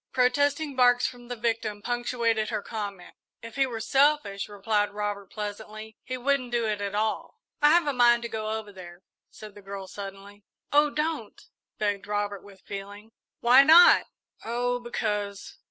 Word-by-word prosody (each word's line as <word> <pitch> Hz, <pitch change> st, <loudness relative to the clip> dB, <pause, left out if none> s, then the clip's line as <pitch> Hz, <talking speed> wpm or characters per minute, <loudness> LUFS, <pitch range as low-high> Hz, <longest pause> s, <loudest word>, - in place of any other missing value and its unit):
Protesting 285 Hz, +3 st, +1 dB
barks 245 Hz, -1 st, +4 dB
from 245 Hz, -1 st, -6 dB
the 245 Hz, -, -5 dB
victim 225 Hz, -2 st, -2 dB
punctuated 235 Hz, -2 st, -1 dB
her 215 Hz, -3 st, -3 dB
comment. 200 Hz, -5 st, -6 dB, 0.3 s
"If 230 Hz, -1 st, -10 dB
he 270 Hz, -1 st, +2 dB
were 230 Hz, -3 st, -5 dB
selfish," 270 Hz, -4 st, +1 dB
replied 205 Hz, +1 st, 0 dB
Robert, 205 Hz, -1 st, -3 dB
pleasantly, 215 Hz, +1 st, -7 dB
"he 255 Hz, -, -5 dB
wouldn't 255 Hz, -1 st, 0 dB
do 235 Hz, -1 st, 0 dB
it 210 Hz, -2 st, -2 dB
at 200 Hz, 0 st, -3 dB
all." 215 Hz, +1 st, -2 dB, 0.2 s
"I 295 Hz, -, +6 dB
have 340 Hz, +1 st, +4 dB
a 290 Hz, -, 0 dB
mind 240 Hz, -1 st, +4 dB
to -, -, -2 dB
go 220 Hz, -1 st, -4 dB
over 220 Hz, -1 st, -4 dB
there," 175 Hz, -1 st, -12 dB, 0.3 s
said 215 Hz, -1 st, -12 dB
the 205 Hz, -, -13 dB
girl, 195 Hz, -1 st, -8 dB
suddenly. 200 Hz, +1 st, -10 dB, 0.3 s
"Oh, 295 Hz, +1 st, +5 dB
don't!" 300 Hz, -7 st, -4 dB, 0.3 s
begged 205 Hz, -1 st, -2 dB
Robert, 205 Hz, -1 st, -2 dB
with 195 Hz, -2 st, -16 dB
feeling. 205 Hz, +2 st, -8 dB, 0.3 s
"Why 245 Hz, +3 st, +7 dB
not?" 320 Hz, +5 st, +7 dB, 0.4 s
"Oh 245 Hz, +1 st, -1 dB
because." 210 Hz, -4 st, -4 dB
220 Hz, 165 wpm, -26 LUFS, 205-245 Hz, 0.4 s, Why